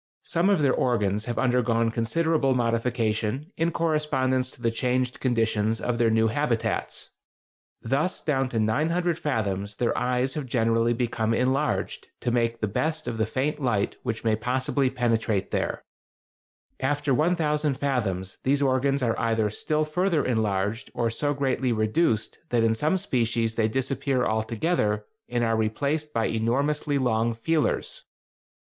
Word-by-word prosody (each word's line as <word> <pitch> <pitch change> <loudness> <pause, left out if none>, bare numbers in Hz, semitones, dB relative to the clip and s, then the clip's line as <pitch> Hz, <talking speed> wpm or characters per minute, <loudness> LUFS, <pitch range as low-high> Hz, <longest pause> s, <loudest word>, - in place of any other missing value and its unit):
Some 170 +4 +1
of 190 -7 +3
their 135 - +4
organs 105 -4 +1
have 120 -1 -3
undergone 120 -3 +2
considerable 135 +4 +1
modification 115 - 0
in 165 +1 +1
correspondence 150 -6 0
to - - -14
the 115 -1 0
changed 125 +2 -1
conditions 115 -3 +1
of 120 -1 -2
their 115 -1 +4
new 110 0 +3
habitats. 120 -2 -1 0.7
Thus 140 +9 0
down 135 -4 0
to 115 - -1
900 160 +10 +1
fathoms 105 - -2
their 120 - 0
eyes 125 +1 0
have 150 -4 -4
generally 115 -1 +2
become 115 -2 0
enlarged, 135 +5 0
to 120 - 0
make 115 -1 0
the 110 - +1
best 155 +9 -2
of 115 -2 -3
the 110 - +1
faint 135 +6 -1
light 110 -6 0
which 115 -3 -3
may 110 -1 +2
possibly 130 +4 0
penetrate 115 -5 0
there. - - -2 1.0
After 145 +1 0
1000 150 -1 +1
fathoms 105 -9 -2
these 140 +2 +2
organs 135 +1 +1
are 115 -2 0
either 110 -2 +1
still 155 +7 -1
further 165 +1 +1
enlarged 105 -2 -1
or 115 -2 0
so 145 +5 -1
greatly 130 -2 0
reduced 110 +2 0
that 120 -2 +2
in 115 0 +3
some 150 +11 +1
species 115 -7 0
they 110 -1 +1
disappear 130 +2 0
altogether 110 0 0 0.2
and 120 -1 0
are 115 -1 +2
replaced 140 +8 -1
by 115 -5 0
enormously 140 +6 0
long 115 -3 +1
feelers. 165 - -1
125 Hz, 145 wpm, -26 LUFS, 115-145 Hz, 1.0 s, their